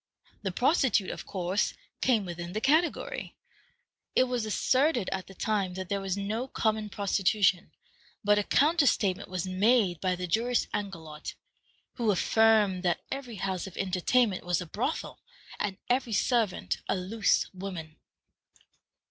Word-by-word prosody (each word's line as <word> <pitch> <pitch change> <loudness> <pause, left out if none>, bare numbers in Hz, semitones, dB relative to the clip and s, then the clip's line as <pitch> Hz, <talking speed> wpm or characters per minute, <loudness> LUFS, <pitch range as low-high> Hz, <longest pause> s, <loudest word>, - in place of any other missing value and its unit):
The 190 - -2
prostitute, 245 - +2
of - - -8
course, 190 +1 -1 0.3
came 230 -6 +2
within 175 0 -6
the 215 - -1
category. 330 - 0 0.8
It - - +6
was 245 -3 -2
asserted 255 - +2
at 190 -1 -3
the 195 - -13
time 195 -3 -1
that 185 -1 -5
there 200 -1 -1
was 195 0 -2
no 215 +5 -2
common 220 -4 -1
prostitution, 200 -1 +1 0.5
but 205 0 +4
a - - 0
counter 300 +6 +3
statement 190 -6 +1
was 185 -1 -3
made 190 -2 +2
by 185 -1 +1
the 180 0 -4
jurist 235 +7 +1
Angelot, 160 -7 -5 0.6
who 235 -3 +1
affirmed 210 -1 +3
that 175 -2 0
every 265 -4 -5
house 190 0 -3
of 190 - -11
entertainment 195 +3 +1
was 175 -1 0
a 180 - -5
brothel, 230 - -3 0.4
and 200 -2 -2
every 245 -2 +1
servant 200 - +1
a - - +2
loose 200 +4 +1
woman. 180 -5 -7
200 Hz, 145 wpm, -29 LUFS, 185-230 Hz, 0.8 s, It